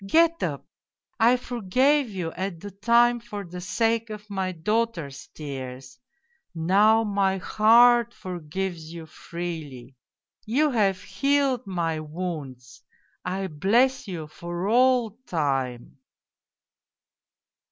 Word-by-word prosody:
Get 330 +7 +3
up! - - -3 0.5
I 235 +3 +5
for 245 -1 -6
gave 265 +7 +3
you 180 -5 -4
at 190 -2 -4
the 205 +3 -8
time 235 +4 +3
for 210 -4 -7
the 180 +1 -8
sake 225 +5 0
of 210 -1 -9
my 190 -2 -1
daughter's 180 -5 -2
tears 130 -3 -8 0.6
now 205 +7 +4
my 200 -2 +1
heart 235 +4 +5
forgives 175 -3 -5
you 165 -1 -8
freely! 155 -7 -7 0.5
You 280 +7 +1
have 195 -6 +1
healed 265 +3 0
my 165 -4 -1
wounds. 150 -6 -6 0.4
I 190 +2 -2
bless 220 - +2
you 170 -5 -5
for 175 +4 -5
all 240 -1 +3
time 135 -6 -2
190 Hz, 110 wpm, -25 LUFS, 165-230 Hz, 0.6 s, I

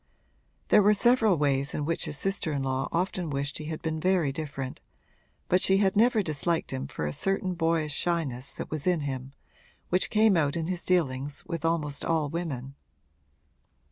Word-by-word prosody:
There 210 - +7
were 210 +1 +5
several 225 -4 +4
ways 140 0 +1
in 150 - -2
which 165 +2 0
his 145 - -2
sister 195 -3 0
in 140 -1 -1
law 135 +1 -1
often 180 -1 -1
wished 140 +1 -2
he 155 - -6
had 155 0 -5
been 160 -1 -2
very 180 -4 +2
different, 140 -3 -5 0.7
but 180 +1 +3
she 190 - +4
had 195 -1 +2
never 225 0 +4
disliked 160 -1 -1
him 130 0 -3
for 75 - -4
a 75 - -2
certain 195 - -1
boyish 165 -3 0
shyness 145 -7 -2
that - - -6
was 155 +1 -3
in 175 -3 +2
him, 135 -1 -5 0.6
which 180 +1 +2
came 215 -2 +4
out 145 -4 +1
in 165 -1 -1
his 180 0 -3
dealings 145 -5 0
with 165 -3 -4
almost 155 -3 -1
all 160 -3 0
women. 140 -5 -4
160 Hz, 180 wpm, -28 LUFS, 140-180 Hz, 0.7 s, There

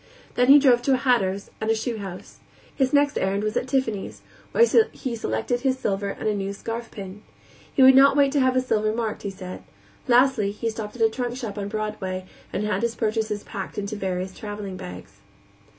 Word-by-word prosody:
Then 250 0 +2
he 280 +2 +9
drove 255 -4 +5
to 270 +2 +2
a - - +4
hatter's 200 -7 0
and 220 - -1
a 225 - +3
shoe 225 +1 -3
house. 190 -3 -9 0.4
His 265 -2 +1
next 285 0 +3
errand 195 +2 0
was 215 0 -2
at 250 - -1
Tiffany's, 255 -7 -2 0.3
where 470 - +5 0.3
he 255 -4 -4
selected 165 - -2
his 265 0 0
silver 200 -5 -2
and 200 - -4
a 215 - +2
new 200 -1 -3
scarf 225 +3 -5
pin. 195 0 -9 0.5
He 265 - +4
would 265 0 +9
not 275 +2 +6
wait 280 -1 +4
to 290 - +1
have 260 -1 +3
his 255 0 +1
silver 215 -3 +1
marked, 225 -2 -3
he 200 - -4
said. 185 -1 -8 0.5
Lastly, 245 -4 +4
he 225 +2 -3
stopped 215 -1 -7
at 235 - 0
a 225 - +5
trunk 245 0 -3
shop 225 -6 -5
on 200 -1 -4
Broadway 205 -3 -4 0.3
and 200 - -2
had 210 -2 -1
his 235 -1 -1
purchases 215 -2 -1
packed 195 - -7
into 205 +1 -3
various 185 -2 -3
traveling 205 -2 -6
bags. 95 - -10
220 Hz, 210 wpm, -24 LUFS, 200-250 Hz, 0.5 s, he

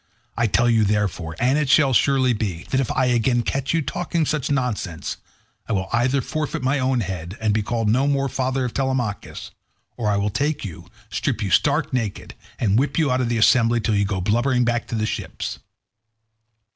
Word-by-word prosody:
I 115 0 +1
tell 120 +3 +2
you, 115 -2 +4
therefore—and 105 - 0
it 150 -3 -1
shall 140 -1 +5
surely 130 0 +3
be—that 105 +3 -2
if 135 - -1
I 130 - +1
again 120 0 +2
catch 135 +2 -1
you 165 -1 +1
talking 165 +2 -1
such 150 -2 -1
nonsense, 120 - -2 0.5
I - - 0
will 95 -2 -1
either 125 +3 +2
forfeit 150 0 -3
my 135 +2 +1
own 130 -1 +1
head 90 -1 -5
and 110 -1 +1
be 110 - +1
no 115 +4 +1
more 140 -1 +1
called 135 - -2
father 130 0 -1
of 125 - -4
Telemachus, 130 -6 -3 0.5
or 115 -3 -1
I 100 - +2
will 100 +1 0
take 145 +6 -1
you, 85 -5 -8 0.2
strip - - -1
you - - -2
stark - - +2
naked, 115 -6 -3 0.2
and 105 -1 +2
whip 140 - -1
you 155 -5 +2
out 130 0 +1
of 120 - -1
the 120 - 0
assembly 115 +1 +4
till 110 0 0
you 100 0 +2
go 95 -1 -2
blubbering 120 +5 +2
back 120 0 -1
to - - -4
the 110 -1 0
ships." - - -4
120 Hz, 195 wpm, -22 LUFS, 105-135 Hz, 0.5 s, shall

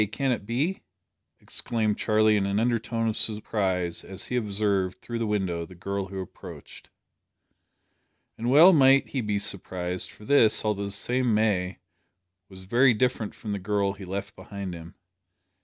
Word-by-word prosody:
Can 135 +4 0
it 105 -4 -3
be?" 145 +11 -1 0.6
exclaimed 110 -3 -1
Charlie 110 0 +3
in 100 -1 +1
an 100 +1 0
undertone 115 -1 0
of 110 - -1
surprise 95 -5 -1
as 95 -1 -7
he 125 - -4
observed, 100 -4 0
through 120 +3 -5
the 115 - -1
window, 95 -5 -1
the 90 +2 -11
girl 100 +1 -3
who 95 0 -6
approached. 95 - -11 1.5
And 115 +2 -3
well 160 +8 +8
might 135 -2 +5
he 135 - -2
be 105 -2 -1
surprised, 90 -2 -3
for 105 - -15
this, 110 -5 +4
although 100 -1 0
the - - -4
same 120 +3 0
May, 95 -4 +1 0.7
was 95 -1 -12
very 120 +5 +4
different 115 -2 -1
from 110 - -6
the 100 - -2
girl 100 0 0
he 100 0 -11
left 100 +3 -5
behind 100 -3 -7
him. 85 0 -10
105 Hz, 160 wpm, -26 LUFS, 95-115 Hz, 1.5 s, well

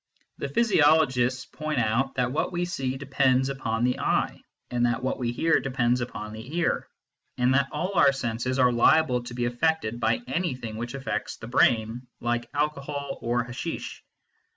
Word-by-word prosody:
The 140 - -3
physiologists 145 - +3
point 155 -1 -4
out 120 +4 +1
that 125 -1 0
what 150 - -1
we 175 0 -1
see 135 -7 -3
depends 130 -1 +2
upon 115 -4 -2
the 125 0 +1
eye, - - 0 0.3
that 120 0 +1
what 130 - -1
we 120 -2 -1
hear 165 +7 +2
depends 125 -1 0
upon 105 -3 -5
the 125 +9 -7
ear, 175 - 0 0.5
and 125 +1 +3
that 140 0 +3
all 180 +6 -2
our 145 -6 +6
senses 130 -1 -2
are 125 -2 +5
liable 125 +2 +4
to 120 0 -8
be 120 -1 -1
affected 120 -2 0
by 240 - +1
anything 130 - -3
which 120 +3 -5
affects 135 0 -3
the - - -9
brain, 120 0 +2
like 120 0 -2
alcohol 145 -1 -2
or 120 +1 0
hasheesh. 120 +1 -6
130 Hz, 165 wpm, -26 LUFS, 120-145 Hz, 0.5 s, our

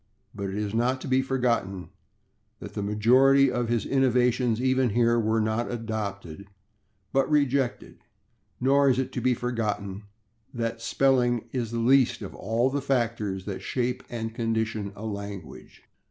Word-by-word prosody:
But 100 -1 -4
it 95 - -5
is 105 0 -3
not 125 +3 +1
to - - -6
be 130 0 +3
forgotten 120 -8 -1 0.7
that - - -9
the - - -3
majority 130 +7 +4
of 120 -1 -1
his 120 -3 0
innovations, 125 -3 +2
even 130 0 +2
here, 115 +2 +2
were 110 0 +1
not 110 +2 -1
adopted, 100 -6 -5 0.7
but 135 +1 +2
rejected, 140 -4 0 0.6
nor 140 +2 +4
is 130 - +2
it 130 0 -1
to - - -4
be 130 -1 +2
forgotten 105 -5 -3 0.5
that 115 -1 -3
spelling 120 -3 +2
is 120 -4 -2
the 115 - -4
least 130 +2 +3
of - - -7
all 115 +5 0
the 140 +1 -1
factors 115 -8 -1
that 100 -2 -5
shape 125 0 -2
and 115 -2 -4
condition 110 -3 -2
a 110 - -8
language. 100 -8 -8
115 Hz, 155 wpm, -26 LUFS, 105-130 Hz, 0.7 s, majority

